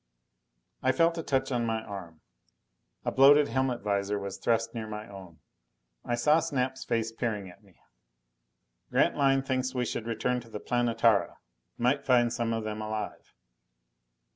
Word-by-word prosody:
I 130 Hz, 0 st, +2 dB
felt 165 Hz, +3 st, +2 dB
a -, -, -1 dB
touch 135 Hz, -3 st, -1 dB
on 120 Hz, -2 st, 0 dB
my 110 Hz, -1 st, -1 dB
arm. 90 Hz, -7 st, -9 dB, 0.8 s
A -, -, 0 dB
bloated 145 Hz, +2 st, +6 dB
helmet 130 Hz, -2 st, 0 dB
visor 100 Hz, 0 st, -1 dB
was 100 Hz, -1 st, -6 dB
thrust 115 Hz, 0 st, 0 dB
near 110 Hz, -2 st, -5 dB
my 105 Hz, 0 st, -6 dB
own. 95 Hz, -6 st, -12 dB, 0.6 s
I 120 Hz, -, -1 dB
saw 150 Hz, +6 st, +4 dB
Snap's 130 Hz, -3 st, -2 dB
face 115 Hz, -1 st, -1 dB
peering 110 Hz, -4 st, -3 dB
at 90 Hz, -, -20 dB
me. 95 Hz, -4 st, -23 dB, 1.1 s
"Grantline 135 Hz, -2 st, +3 dB
thinks 130 Hz, -1 st, -1 dB
we 125 Hz, -1 st, 0 dB
should 115 Hz, -1 st, -4 dB
return 120 Hz, +2 st, -1 dB
to 115 Hz, -1 st, -13 dB
the 105 Hz, -, -6 dB
Planetara. 115 Hz, -3 st, +1 dB, 0.4 s
Might 130 Hz, +4 st, +1 dB
find 120 Hz, -3 st, +3 dB
some 115 Hz, -1 st, -1 dB
of 115 Hz, -1 st, -1 dB
them 110 Hz, 0 st, -4 dB
alive." 110 Hz, 0 st, -5 dB
115 Hz, 155 wpm, -29 LUFS, 110-130 Hz, 1.1 s, bloated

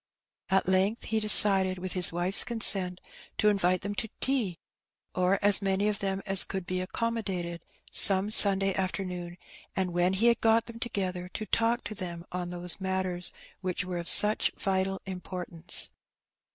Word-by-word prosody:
At 190 Hz, -1 st, +1 dB
length 190 Hz, +5 st, 0 dB
he 220 Hz, -, -1 dB
decided, 195 Hz, -3 st, +5 dB
with 185 Hz, 0 st, -5 dB
his 180 Hz, -1 st, +3 dB
wife's 175 Hz, +4 st, -1 dB
consent, 195 Hz, -6 st, -2 dB, 0.4 s
to 210 Hz, -, +3 dB
invite 185 Hz, -3 st, 0 dB
them 205 Hz, 0 st, -5 dB
to 220 Hz, +2 st, -4 dB
tea, 235 Hz, -11 st, 0 dB, 0.6 s
or 185 Hz, +2 st, +1 dB
as 205 Hz, 0 st, +7 dB
many 195 Hz, +1 st, 0 dB
of 210 Hz, -1 st, -2 dB
them 195 Hz, 0 st, -3 dB
as 195 Hz, -2 st, +4 dB
could 190 Hz, -2 st, -6 dB
be 185 Hz, +1 st, -3 dB
accommodated, 190 Hz, -4 st, -4 dB, 0.3 s
some 195 Hz, +1 st, +4 dB
Sunday 195 Hz, -2 st, +5 dB
afternoon, 180 Hz, -2 st, -5 dB, 0.4 s
and 185 Hz, -2 st, -2 dB
when 175 Hz, +2 st, +1 dB
he 200 Hz, +5 st, -1 dB
had 235 Hz, 0 st, +2 dB
got 225 Hz, 0 st, +2 dB
them 230 Hz, -1 st, -11 dB
together, 185 Hz, -6 st, -4 dB
to 215 Hz, -, -4 dB
talk 230 Hz, +3 st, 0 dB
to -, -, -6 dB
them 175 Hz, -4 st, -7 dB
on 180 Hz, -1 st, -5 dB
those 175 Hz, +1 st, -5 dB
matters 190 Hz, -2 st, -1 dB, 0.3 s
which 185 Hz, 0 st, -4 dB
were 180 Hz, -1 st, -5 dB
of 170 Hz, -1 st, -6 dB
such 210 Hz, +1 st, +5 dB
vital 190 Hz, 0 st, -2 dB
importance. 180 Hz, -3 st, 0 dB
190 Hz, 165 wpm, -27 LUFS, 180-205 Hz, 0.6 s, as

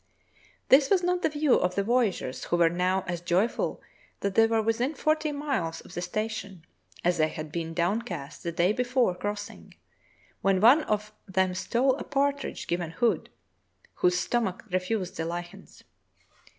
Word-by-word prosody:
This 270 Hz, +1 st, +6 dB
was 375 Hz, -3 st, +3 dB
not 360 Hz, 0 st, +1 dB
the -, -, +2 dB
view 295 Hz, -2 st, +2 dB
of 180 Hz, 0 st, +2 dB
the 200 Hz, -, +1 dB
voyageurs, 215 Hz, -, 0 dB
who 175 Hz, -, 0 dB
were 170 Hz, -1 st, +4 dB
now 180 Hz, +2 st, +1 dB
as 175 Hz, -2 st, -4 dB
joyful 180 Hz, +6 st, 0 dB, 0.4 s
that 200 Hz, -1 st, -1 dB
they 225 Hz, +3 st, +5 dB
were 225 Hz, -1 st, +1 dB
within 240 Hz, +7 st, 0 dB
forty 310 Hz, 0 st, +1 dB
miles 275 Hz, -, -2 dB
of -, -, -14 dB
the 175 Hz, -, -3 dB
station 195 Hz, -2 st, -4 dB, 0.4 s
as 175 Hz, -1 st, +1 dB
they 155 Hz, -, +4 dB
had 155 Hz, -1 st, -7 dB
been 165 Hz, 0 st, -4 dB
downcast 175 Hz, -, -2 dB
the 170 Hz, -, -3 dB
day 175 Hz, +4 st, +2 dB
before 250 Hz, -3 st, +1 dB
crossing, 205 Hz, +3 st, -6 dB, 0.7 s
when 195 Hz, -1 st, +3 dB
one 245 Hz, +10 st, +7 dB
of 210 Hz, 0 st, -2 dB
them 190 Hz, -1 st, +1 dB
stole 245 Hz, +8 st, +1 dB
a -, -, -5 dB
partridge 280 Hz, -1 st, -1 dB
given 175 Hz, -1 st, -2 dB
Hood, 205 Hz, 0 st, 0 dB, 0.6 s
whose 180 Hz, 0 st, +2 dB
stomach 225 Hz, -5 st, -1 dB
refused 185 Hz, +1 st, -2 dB
the 160 Hz, -, -2 dB
lichens. 175 Hz, +1 st, -7 dB
200 Hz, 165 wpm, -27 LUFS, 175-245 Hz, 0.7 s, one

